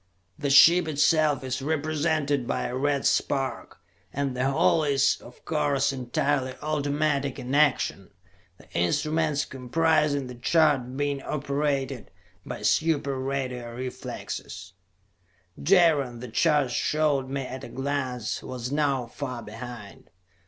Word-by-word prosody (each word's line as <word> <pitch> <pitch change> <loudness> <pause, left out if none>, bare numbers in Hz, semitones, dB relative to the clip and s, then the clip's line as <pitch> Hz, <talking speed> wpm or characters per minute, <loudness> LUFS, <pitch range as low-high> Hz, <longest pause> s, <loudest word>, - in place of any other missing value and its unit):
The 145 - -1
ship 170 +5 +7
itself 150 -1 +2
is 130 +1 -3
represented 150 -2 0
by - - -1
a 125 - -3
red 140 +1 0
spark 135 -1 -1 0.3
and 140 -2 -2
the 130 +2 +1
whole 155 +3 +3
is, 140 -2 +2
of 120 - -15
course, 145 -3 +1
entirely 130 +1 -1
automatic 145 -2 0
in 125 +2 -5
action, 150 +1 +2 0.5
the - - -19
instruments 150 - 0
comprising 145 +2 +1
the 125 - -8
chart 130 -1 +2
being 145 -1 -1
operated 140 -3 -2 0.3
by - - -7
super 145 +1 +1
radio 130 -3 -3
reflexes. 125 -6 -6 0.9
Jaron, 150 -8 +3
the 125 0 -7
charts 145 0 +2
showed 145 -3 +1
me 135 0 -2
at 130 +1 -7
a - - -8
glance, 130 -4 -3
was 125 0 -6
now 140 -4 +1
far 125 0 -6
behind. 115 -1 -10
140 Hz, 125 wpm, -26 LUFS, 130-150 Hz, 0.9 s, ship